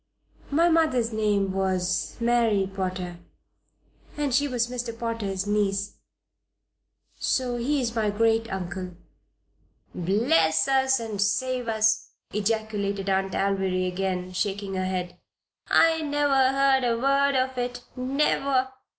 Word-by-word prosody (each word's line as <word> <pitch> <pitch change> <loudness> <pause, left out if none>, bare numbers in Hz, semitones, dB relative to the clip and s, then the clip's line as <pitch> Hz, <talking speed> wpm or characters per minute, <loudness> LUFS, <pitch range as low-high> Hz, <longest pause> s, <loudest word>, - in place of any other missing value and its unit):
"My 330 +4 +3
mother's 310 -9 +2
name 205 -3 +1
was 185 -3 -1
Mary 230 -4 +2
Potter, 185 -2 -4 1.0
and 290 -3 -1
she 285 +3 +3
was 245 -3 0
Mr. 240 -2 -5
Potter's 215 -5 -3
niece. 205 -1 -1 1.2
So 250 -2 0
he 280 +5 0
is 235 -2 -2
my 220 -2 +1
great 225 +2 +1
uncle." 185 -1 -5 1.0
"Bless 165 -4 +2
us 265 -1 +3
and 220 -3 -4
save 250 +4 0
us!" 220 -1 +1 0.2
ejaculated 205 -2 -1
Aunt 190 0 0
Alviry, 190 -2 0
again, 185 0 -3
shaking 200 +1 -2
her 185 0 -1
head. 180 -1 -4 0.5
"I 325 -1 +4
never 290 -3 +2
heard 270 -1 +3
a 235 -1 +1
word 275 +1 +2
of 260 0 0
it 245 0 -4
never! 265 0 +1
220 Hz, 120 wpm, -26 LUFS, 195-255 Hz, 1.2 s, I